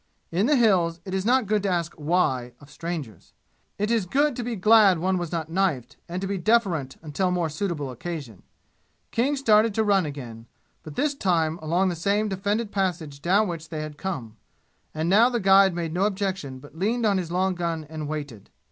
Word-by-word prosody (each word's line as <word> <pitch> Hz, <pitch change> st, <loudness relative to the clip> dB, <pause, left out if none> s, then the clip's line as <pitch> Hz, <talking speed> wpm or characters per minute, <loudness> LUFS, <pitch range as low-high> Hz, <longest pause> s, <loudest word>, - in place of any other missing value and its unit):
In 190 Hz, +7 st, +1 dB
the 295 Hz, -, +4 dB
"Hills" 180 Hz, -9 st, +3 dB
it 190 Hz, -, -6 dB
is 190 Hz, +2 st, -1 dB
not 255 Hz, 0 st, +3 dB
good 210 Hz, +1 st, +1 dB
to 200 Hz, -, -1 dB
ask 170 Hz, -2 st, -1 dB
"why" 145 Hz, -6 st, 0 dB
of 145 Hz, -1 st, -16 dB
strangers. 155 Hz, -, -6 dB, 0.4 s
It 210 Hz, +2 st, -1 dB
is 225 Hz, -6 st, +1 dB
good 285 Hz, +6 st, +2 dB
to 245 Hz, -, -4 dB
be 235 Hz, 0 st, -3 dB
glad 210 Hz, -2 st, +5 dB
one 185 Hz, +2 st, 0 dB
was 175 Hz, -2 st, -4 dB
not 165 Hz, -2 st, -2 dB
knifed, 160 Hz, -8 st, -1 dB
and 175 Hz, +2 st, -3 dB
to -, -, -1 dB
be 195 Hz, -1 st, -2 dB
deferent 175 Hz, -, +1 dB
until 165 Hz, +5 st, -1 dB
more 175 Hz, -3 st, 0 dB
suitable 150 Hz, -4 st, -3 dB
occasion. 145 Hz, -, -7 dB, 0.7 s
King 265 Hz, +5 st, +1 dB
started 220 Hz, -5 st, +3 dB
to 220 Hz, -, +2 dB
run 195 Hz, -5 st, +2 dB
again, 120 Hz, -6 st, -8 dB, 0.3 s
but 155 Hz, -2 st, -10 dB
this 295 Hz, 0 st, +1 dB
time 170 Hz, -, 0 dB
along 175 Hz, +5 st, +1 dB
the 175 Hz, -, -2 dB
same 200 Hz, +5 st, 0 dB
defended 205 Hz, +3 st, -1 dB
passage 165 Hz, -7 st, -2 dB
down 195 Hz, +6 st, +3 dB
which 165 Hz, -2 st, -6 dB
they 155 Hz, -2 st, -4 dB
had 155 Hz, -1 st, -7 dB
come. 130 Hz, -, -5 dB, 0.5 s
And 155 Hz, +1 st, -2 dB
now 215 Hz, +7 st, +5 dB
the 240 Hz, -2 st, -1 dB
guide 195 Hz, -2 st, +5 dB
made 165 Hz, -2 st, -3 dB
no 185 Hz, +3 st, +1 dB
objection 190 Hz, -9 st, -2 dB
but 145 Hz, +3 st, -15 dB
leaned 220 Hz, +7 st, 0 dB
on 200 Hz, -3 st, +3 dB
his 170 Hz, -2 st, -5 dB
long 185 Hz, +1 st, +1 dB
gun 170 Hz, -3 st, -3 dB
and 155 Hz, -1 st, -6 dB
waited. 145 Hz, -9 st, -6 dB
180 Hz, 200 wpm, -25 LUFS, 155-205 Hz, 0.7 s, glad